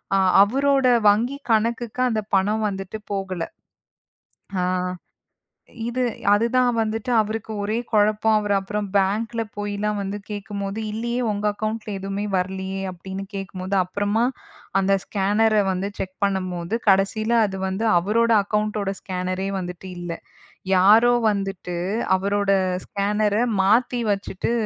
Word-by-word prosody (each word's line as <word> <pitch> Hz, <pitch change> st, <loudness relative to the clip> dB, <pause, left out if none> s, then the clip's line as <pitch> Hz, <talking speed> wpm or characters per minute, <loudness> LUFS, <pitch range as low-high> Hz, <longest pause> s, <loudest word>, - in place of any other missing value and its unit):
அ -, -, +4 dB, 0.2 s
அவரோட 270 Hz, +4 st, +2 dB, 0.2 s
வங்கி 240 Hz, +7 st, +1 dB
கணக்குக்கு 230 Hz, +2 st, 0 dB
அந்தப் 215 Hz, -2 st, -3 dB
பணம் 210 Hz, +3 st, +1 dB
வந்துட்டு 195 Hz, +2 st, -5 dB, 0.2 s
போகலை. 185 Hz, -3 st, -3 dB, 1.1 s
ஆ, -, -, +1 dB, 1.2 s
இது 250 Hz, +2 st, -2 dB, 0.3 s
அது 215 Hz, +3 st, +3 dB
தான் 250 Hz, -1 st, +4 dB
வந்துட்டு 225 Hz, +2 st, -1 dB
அவருக்கு 220 Hz, +1 st, -2 dB
ஒரே 215 Hz, +3 st, -1 dB
கொழப்பம். 215 Hz, +1 st, +3 dB
அவரு 205 Hz, -1 st, 0 dB
அப்புறம் 205 Hz, +1 st, -3 dB
பேங்க்ல 220 Hz, +4 st, +1 dB, 0.2 s
போய்லாம் 205 Hz, 0 st, -2 dB
வந்து 200 Hz, +1 st, -3 dB
கேக்கும்போது, 205 Hz, 0 st, -4 dB
"இல்லையே 235 Hz, +3 st, -2 dB
உங்க 205 Hz, +1 st, -3 dB
அக்கவுண்ட்ல 215 Hz, +1 st, -4 dB
எதுவுமே 195 Hz, +2 st, -3 dB
வரலையே:" 190 Hz, +1 st, -2 dB
அப்படின்னு 190 Hz, +2 st, -7 dB
கேக்கும்போது 195 Hz, 0 st, -4 dB
அப்புறமா 205 Hz, +4 st, 0 dB, 0.6 s
அந்த 195 Hz, +1 st, +2 dB
ஸ்கேன்னர 210 Hz, +2 st, +2 dB
வந்து 190 Hz, +2 st, -2 dB
செக் 185 Hz, 0 st, -4 dB
பண்ணும்போது, 185 Hz, 0 st, -2 dB
கடைசியில 205 Hz, +4 st, +2 dB
அது 190 Hz, -1 st, -6 dB
வந்து 190 Hz, +4 st, -2 dB
அவரோட 230 Hz, +6 st, +2 dB
அக்கவுண்ட்டோட 210 Hz, -1 st, -1 dB
ஸ்கேனரே 185 Hz, 0 st, -3 dB
வந்துட்டு 180 Hz, +1 st, -7 dB
இல்ல. 175 Hz, -1 st, -5 dB, 0.6 s
யாரோ 215 Hz, +6 st, +6 dB, 0.2 s
வந்துட்டு 195 Hz, -3 st, -3 dB, 0.4 s
அவரோட 200 Hz, +1 st, 0 dB, 0.4 s
ஸ்கேனர 205 Hz, +1 st, 0 dB, 0.3 s
மாத்தி 235 Hz, +4 st, +2 dB
வச்சிட்டு 195 Hz, +2 st, -3 dB
205 Hz, 120 wpm, -23 LUFS, 195-220 Hz, 1.2 s, யாரோ